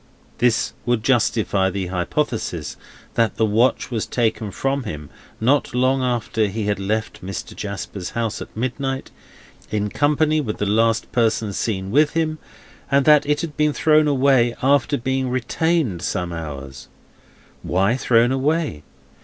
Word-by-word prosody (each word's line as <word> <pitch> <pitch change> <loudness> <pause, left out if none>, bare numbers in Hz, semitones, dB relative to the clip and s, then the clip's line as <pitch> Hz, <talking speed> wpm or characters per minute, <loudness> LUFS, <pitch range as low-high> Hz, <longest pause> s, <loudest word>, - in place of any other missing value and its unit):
This 120 -1 +2
would 120 -3 0
justify 105 -6 +2
the 95 -1 -3
hypothesis 90 - -2 0.4
that 115 -1 +1
the 110 - +2
watch 115 +4 +1
was 115 -3 -2
taken 110 -3 0
from 135 +6 -1
him 75 - -7 0.3
not 130 +2 +1
long 130 +1 +2
after 120 -3 0
he 105 0 -1
left 105 +2 -3
Mr. 95 +1 -6
Jasper's 100 -2 -5
house 115 -2 -2
at - - -10
midnight, 135 +2 -3 0.6
in 105 -1 -1
company 150 +1 +2
with 110 -7 -4
the 105 - -1
last 115 +2 +1
person 110 -3 +1
seen 95 -2 -2
with 150 +5 +3
him, 155 -2 -1 0.5
and 140 -1 +3
that 150 -2 +5
it 150 0 +1
had 160 -4 -5
been 150 -1 +2
thrown 155 0 +4
away 130 -4 +3
after 140 +1 +3
being 130 +1 -1
retained 130 - 0
some 90 -2 -2
hours. 70 -5 -7 0.7
Why 95 +7 +1
thrown 120 -1 +3
away? 140 - 0
120 Hz, 145 wpm, -21 LUFS, 105-140 Hz, 0.7 s, that